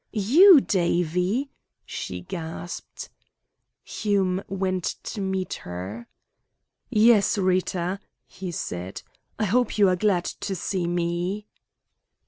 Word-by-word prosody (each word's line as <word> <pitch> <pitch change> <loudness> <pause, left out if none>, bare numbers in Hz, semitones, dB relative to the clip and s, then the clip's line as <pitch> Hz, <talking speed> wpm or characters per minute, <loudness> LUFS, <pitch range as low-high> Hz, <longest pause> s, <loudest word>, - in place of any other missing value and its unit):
"You, 290 - +7
Davie!" 180 - 0 0.3
she 90 0 -5
gasped. 170 - -7 0.7
Hume 195 -3 0
went 185 -2 -2 0.2
to 210 - -5
meet 190 -1 -2
her. 95 +7 -7 0.8
"Yes, 215 -1 +4
Rita," 185 0 0 0.3
he 185 -1 -7
said. 90 - -5 0.3
"I 215 - 0
hope 240 +5 +1
you 205 -2 +6
are 180 - +2
glad 180 -2 +1
to 195 - -4
see 185 -1 -2
me." 175 +4 -1
185 Hz, 105 wpm, -25 LUFS, 175-205 Hz, 0.8 s, You